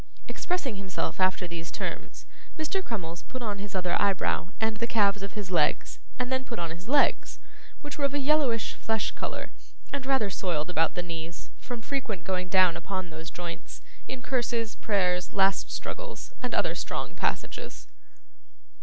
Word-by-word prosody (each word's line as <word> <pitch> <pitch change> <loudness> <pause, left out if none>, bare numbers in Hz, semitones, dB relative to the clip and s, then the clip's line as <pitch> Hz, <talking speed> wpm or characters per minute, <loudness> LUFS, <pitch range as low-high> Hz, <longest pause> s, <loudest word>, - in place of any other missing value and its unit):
Expressing 310 - -1
himself 190 -1 -2
after 185 -1 +3
these 170 -1 -5
terms, - - -4 0.3
Mr. 320 +5 0
Crummles 175 - -4
put 255 -1 -6
on 205 -3 -1
his 200 0 -5
other 180 -2 +2
eyebrow, 195 -3 +2
and 220 -1 +1
the 235 +2 0
calves 205 -3 +4
of 195 - -4
his 205 -3 -4
legs, 175 - +2 0.2
and 250 0 -1
then 260 0 +2
put 235 -2 -5
on 170 -1 -2
his 175 +7 -8
legs, 285 +1 +4 0.4
which 290 0 -6
were 285 - +3
of 280 0 +1
a - - +3
yellowish 280 -5 +3
flesh 220 -1 0
colour, - - -4 0.4
and 280 -2 -1
rather 265 -7 +3
soiled 175 -3 0
about 165 -2 +3
the 180 - 0
knees, 165 0 -6
from 240 -2 -5
frequent 235 -10 -2
going 180 -1 0
down 185 -2 +6
upon 185 -3 -3
those 160 +1 -6
joints, 170 0 -6 0.2
in 255 -1 -5
curses, 235 -4 0
prayers, 180 -4 +1
last 195 -1 +4
struggles, - - -5
and - - -1
other - - +3
strong - - -3
passages. - - -2
200 Hz, 170 wpm, -29 LUFS, 180-250 Hz, 0.4 s, down